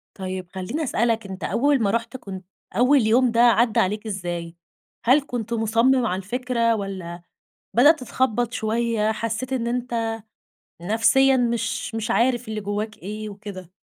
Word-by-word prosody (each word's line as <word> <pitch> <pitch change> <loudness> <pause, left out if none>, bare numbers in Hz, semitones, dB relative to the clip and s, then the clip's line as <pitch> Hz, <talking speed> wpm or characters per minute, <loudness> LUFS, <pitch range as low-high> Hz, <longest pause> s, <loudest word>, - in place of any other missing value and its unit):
طيب، 185 -2 -5
خليني 190 - -3
أسألك، 230 -4 0
أنت 190 0 -8
أول 280 0 +2
ما 200 - +2
رُحت 230 +3 -2
كنت 190 -5 -9 0.3
أول 255 +5 +4
يوم 245 +2 +4
ده 230 - 0
عدى 235 -1 +4
عليك 210 +4 0
إزاي؟ 175 -4 -4 0.5
هل 265 +5 +5
كنت 235 -1 -4
مصمم 230 +3 +2
على 185 - 0
الفكرة؟ 235 +2 0
والّا 185 -4 -6 0.5
بدأت 290 +6 +6
تتخبط 245 -2 -1
شوية 220 -1 0
حسيت 230 +4 -3
إن 235 -2 -1
أنت 235 -2 -2 0.7
نفسيًا 245 +7 +4
مش 235 -1 -1
مش 220 -1 -2
عارف 240 0 +1
اللي 215 -1 -4
جواك 210 +2 -3
إيه 215 +1 -6
وكده؟ 200 -3 -9
225 Hz, 145 wpm, -23 LUFS, 205-245 Hz, 0.7 s, بدأت